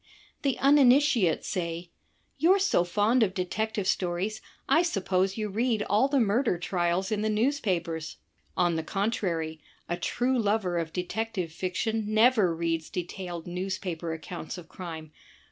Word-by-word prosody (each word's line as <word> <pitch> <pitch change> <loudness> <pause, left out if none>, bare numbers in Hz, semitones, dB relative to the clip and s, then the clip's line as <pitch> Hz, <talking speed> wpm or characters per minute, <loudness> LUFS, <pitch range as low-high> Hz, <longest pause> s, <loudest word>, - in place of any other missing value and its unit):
The 270 -4 0
uninitiate 270 - +4
say, 170 -2 -3 0.5
"You're 360 +5 +5
so 390 - +2
fond 210 +7 +2
of 195 -4 +2
detective 205 +3 -2
stories, 185 +4 -1 0.3
I 320 - +5
su^ose 195 - 0
you 215 -1 -1
read 220 +1 0
all 210 +7 +3
the 280 -1 +2
murder 225 -2 +2
trials 175 +2 -1
in 210 -1 0
the 215 - 0
newspapers." 190 - -1 0.4
On 175 -2 +2
the 160 - -2
contrary, 170 -5 -2 0.3
a 175 - -2
true 245 +8 0
lover 200 -5 +1
of 165 -1 -3
detective 185 -1 -3
fiction 210 +5 -2
never 215 -6 +4
reads 165 -1 -2
detailed 175 -1 -5
newspaper 180 -2 -3
accoimts 170 +1 -7
of 175 -2 -10
crime. 160 -4 -8
190 Hz, 140 wpm, -28 LUFS, 175-225 Hz, 0.5 s, You're